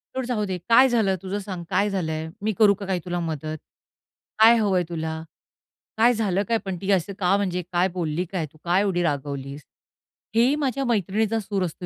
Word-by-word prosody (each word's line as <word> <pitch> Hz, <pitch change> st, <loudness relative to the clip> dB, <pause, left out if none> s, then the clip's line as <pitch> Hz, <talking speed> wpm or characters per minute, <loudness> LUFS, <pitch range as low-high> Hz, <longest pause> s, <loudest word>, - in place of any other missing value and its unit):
"सोड, 260 Hz, -1 st, -2 dB
जाऊ 235 Hz, -4 st, -1 dB
दे. 190 Hz, -2 st, -3 dB
काय 255 Hz, +3 st, +7 dB
झालं 220 Hz, -6 st, +2 dB
तुझं? 195 Hz, +2 st, -3 dB
सांग, 190 Hz, -3 st, -6 dB
काय 200 Hz, +2 st, +2 dB
झालंय? 160 Hz, -4 st, -3 dB
मी 220 Hz, -, +1 dB
करू 210 Hz, -2 st, +7 dB
का 200 Hz, 0 st, -7 dB
काय 185 Hz, -2 st, -1 dB
तुला 175 Hz, 0 st, -2 dB
मदत? 155 Hz, -2 st, -4 dB, 0.8 s
काय 225 Hz, +2 st, +8 dB
हवंय 195 Hz, -5 st, +2 dB
तुला? 160 Hz, -1 st, -3 dB, 0.8 s
काय 235 Hz, +2 st, +5 dB
झालं 205 Hz, -4 st, 0 dB
काय 230 Hz, -, +2 dB
पण? 190 Hz, -2 st, -3 dB
ती 200 Hz, +1 st, 0 dB
असं 190 Hz, +1 st, +1 dB
का 190 Hz, 0 st, +3 dB
म्हणजे 180 Hz, -3 st, -1 dB
काय 180 Hz, +1 st, +2 dB
बोलली 170 Hz, +1 st, -1 dB
काय? 180 Hz, -4 st, -2 dB
तू -, -, -19 dB
काय 180 Hz, +3 st, +2 dB
एवढी 185 Hz, -4 st, 0 dB
रागवलीस?" 140 Hz, -2 st, -3 dB, 0.7 s
हे 235 Hz, +2 st, +5 dB
ही 280 Hz, -, +2 dB
माझ्या 270 Hz, 0 st, -1 dB
मैत्रिणीचा 220 Hz, 0 st, 0 dB
सूर 200 Hz, -2 st, -2 dB
असतो 180 Hz, +1 st, -7 dB
190 Hz, 195 wpm, -24 LUFS, 175-215 Hz, 0.8 s, काय